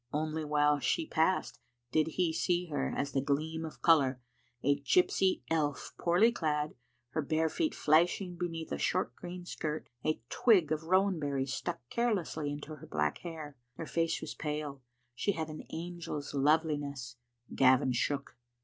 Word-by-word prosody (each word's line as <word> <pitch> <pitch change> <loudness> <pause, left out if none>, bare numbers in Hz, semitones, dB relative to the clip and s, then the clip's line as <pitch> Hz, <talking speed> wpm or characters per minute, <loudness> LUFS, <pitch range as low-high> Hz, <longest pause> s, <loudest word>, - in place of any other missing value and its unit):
Only 155 +1 -1
while 150 -1 +3
she 325 - +1
passed 170 - +1 0.3
did 155 0 +3
he 175 -3 +2
see 175 +2 +1
her 145 -3 -1
as 140 - -2
a 135 - +3
gleam 155 +4 -1
of 160 - -8
colour, 140 -6 +5 0.4
a 140 +1 +3
gypsy 180 +5 +3
elf 150 -3 0
poorly 180 +7 +4
clad, 150 -7 -1 0.4
her 155 +5 -1
bare 160 +2 +1
feet 315 - -1
flashing 175 +4 +3
beneath 165 -2 -4
a - - -2
short 185 - 0
green 180 0 -8
skirt, 155 -3 -4
a 155 -4 0
twig 185 -10 +4
of 155 0 -1
rowan 185 +1 +3
berries 140 -2 -1
stuck 120 - -4
carelessly 190 -10 0
into 150 +1 -6
her - - -12
black 75 -1 0
hair. 155 -4 -7 0.2
Her 165 - -5
face 165 +1 0
was - - -5
pale. 150 -2 -4 0.3
She 200 +11 0
had 160 -2 -3
an 155 - -8
angel's 165 -4 -5
loveli 150 +2 +3
ness. 135 -4 -6 0.4
Gavin 130 0 +5
shook. 140 +3 -1
155 Hz, 160 wpm, -32 LUFS, 145-170 Hz, 0.4 s, colour